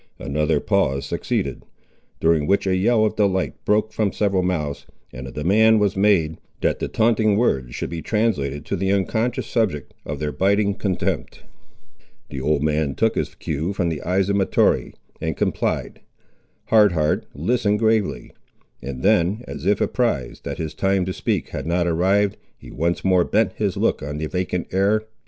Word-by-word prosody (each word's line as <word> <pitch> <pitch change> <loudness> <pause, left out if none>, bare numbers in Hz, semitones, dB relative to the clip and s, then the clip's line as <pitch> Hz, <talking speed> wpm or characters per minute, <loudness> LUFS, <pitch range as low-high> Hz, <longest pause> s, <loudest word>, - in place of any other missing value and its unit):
Another 75 +1 0
pause 70 -10 0
succeeded, - - -2 0.6
during 80 -2 +2
which 100 0 +2
a 95 -1 +2
yell 110 +4 +3
of 110 - -1
delight 95 -3 +1
broke 110 +1 +1
from 105 -3 0
several 100 -2 +1
mouths, 80 -6 -2 0.3
and 65 +1 -7
a - - -8
demand 110 +9 +4
was 105 -2 +1
made, 95 -6 +2 0.2
that - - +1
the - - -2
taunting 110 -2 +2
words 65 - 0
should - - -4
be 85 -1 -4
translated 75 -12 -1
to - - -2
the 95 +1 0
unconscious 110 +5 0
subject 100 - -1
of - - -5
their 75 -1 -2
biting 100 +3 +2
contempt. 95 -2 -3 0.9
The 65 - -5
old 75 +1 +1
man 75 -2 0
took - - +2
his - - -3
cue 80 +4 -3
from 90 -3 0
the 80 -3 -4
eyes 95 +2 +1
of 100 0 +1
Mahtoree, 95 - +1 0.3
and - - -2
complied. - - -2 0.7
Hard 105 -4 +5
Heart 75 -2 0
listened 105 - +1
gravely, 110 - 0 0.5
and 65 0 -6
then, 105 +2 +2
as - - -6
if 105 0 +3
apprized 115 - -1
that - - -4
his 80 -1 -4
time 95 +3 +1
to 95 - -3
speak - - -2
had - - -5
not 85 +1 +1
arrived, 95 +4 +2 0.2
he - - -13
once 85 +5 -1
more 95 -2 +4
bent 110 +4 +1
his 100 -4 -2
look - - +1
on 75 +1 -5
the 80 - -2
vacant 90 +1 -2
air. 100 +3 +2
95 Hz, 175 wpm, -22 LUFS, 75-105 Hz, 0.9 s, Hard